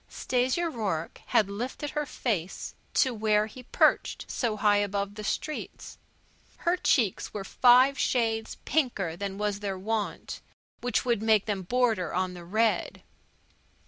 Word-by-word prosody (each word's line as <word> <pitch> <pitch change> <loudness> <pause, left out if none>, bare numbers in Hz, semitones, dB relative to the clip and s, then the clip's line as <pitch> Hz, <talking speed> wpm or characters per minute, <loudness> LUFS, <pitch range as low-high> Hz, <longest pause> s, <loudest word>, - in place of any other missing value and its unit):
Stasia 260 +7 0
Rourke 205 - -3
had 210 - +3
lifted 245 +8 -4
her 300 -1 -2
face 195 -11 -3 0.2
to 260 -3 +3
where 215 -1 +2
he 225 +4 -10
perched 250 - +2
so 225 -4 -1
high 205 0 +4
above 200 0 -1
the 210 +1 -8
streets. 305 +8 -4 0.6
Her 345 +1 +1
cheeks 235 - +1
were 200 - -3
five 255 +6 +5
shades 225 -3 0
pinker 220 - 0
than 195 +1 -4
was 205 -1 -1
their 200 -2 -3
wont, 215 +2 -3 0.4
which 245 +1 0
would 235 -4 +1
make 220 -2 +3
them 205 -3 -2
border 220 -4 0
on 185 0 0
the 175 -1 -9
red. 220 +5 0
215 Hz, 145 wpm, -28 LUFS, 200-245 Hz, 0.6 s, five